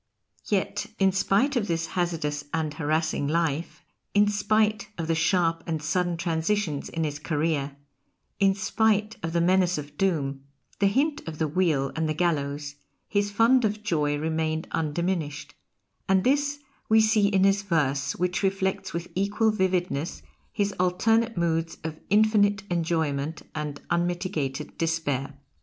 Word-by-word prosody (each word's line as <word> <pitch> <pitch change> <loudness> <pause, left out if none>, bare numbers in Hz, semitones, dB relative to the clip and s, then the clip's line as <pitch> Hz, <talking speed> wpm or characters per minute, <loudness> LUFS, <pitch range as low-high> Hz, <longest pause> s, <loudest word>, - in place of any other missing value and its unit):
Yet - - -1
in 195 -1 +4
spite 200 +9 +2
of 225 -4 0
this 165 -2 -1
hazardous 155 -5 -1
and 155 -2 -1
harassing 155 -1 0
life, 165 0 -1 0.3
in 205 0 +5
spite 215 +1 +1
of 165 - -2
the 165 - +1
sharp 165 0 +1
and 160 -2 -1
sudden 175 +3 0
transitions 165 -1 -1
in 165 - -2
his 150 -1 -3
career, 150 -3 -1 0.6
in 195 -1 +4
spite 215 +2 +1
of 165 - -3
the 170 0 +1
menace 180 0 +3
of 145 0 -8
doom, 140 -8 0 0.4
the 200 - +4
hint 285 +8 +1
of 160 -1 -5
the 160 - 0
wheel 150 -5 +1
and 160 -1 0
the 155 - -1
gallows, 145 -3 -1 0.3
his 205 0 0
fund 230 +5 +4
of 215 0 -1
joy 150 -7 +1
remained 160 +1 -1
undiminished, 160 -1 -2 0.6
and 190 -1 +4
this 285 +2 +2 0.3
we 220 0 +6
see 215 -2 +4
in 195 -2 +2
his 195 +1 +4
verse, 145 -7 0
which 180 +1 -1
reflects 190 -1 -1
with 170 +1 -3
equal 205 +3 +1
vividness 180 -6 -1 0.3
his 205 -1 -1
alternate 225 +5 +2
moods 165 -1 0
of 160 -1 -5
infinite 205 -1 +3
enjoyment 160 -3 -1
and 150 -2 -4
unmitigated 170 -5 -1
despair. 145 -4 -1
170 Hz, 145 wpm, -26 LUFS, 155-200 Hz, 0.6 s, we